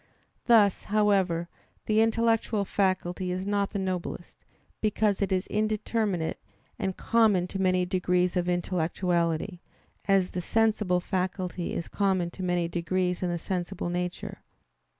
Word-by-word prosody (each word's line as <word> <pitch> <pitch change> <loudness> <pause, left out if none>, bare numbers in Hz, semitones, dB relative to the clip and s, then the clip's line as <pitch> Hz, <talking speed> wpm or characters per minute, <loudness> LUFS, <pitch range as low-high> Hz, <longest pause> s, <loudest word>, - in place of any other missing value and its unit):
Thus, 215 -5 +5
however, 195 -5 +2 0.4
the 215 0 +3
intellectual 225 -2 +2
faculty 185 -2 0
is 185 +1 -2
not 200 -1 0
the 205 - -4
noblest, 185 -2 -4 0.4
because 215 -1 +1
it 200 - 0
is 185 0 +1
indeterminate 215 -4 -1 0.4
and 190 -1 -2
common 220 -6 +3
to 195 - -3
many 185 -1 +2
degrees 180 0 +1
of 180 0 0
intellectuality; 175 0 0 0.5
as 195 -2 +3
the 180 - -3
sensible 210 -3 +1
faculty 185 -1 -2
is 170 - -3
common 190 -4 0
to 190 - -9
many 175 -2 0
degrees 180 +1 -1
in 180 - 0
the 175 - -1
sensible 175 +1 -3
nature. 180 0 -4
185 Hz, 130 wpm, -28 LUFS, 180-205 Hz, 0.5 s, Thus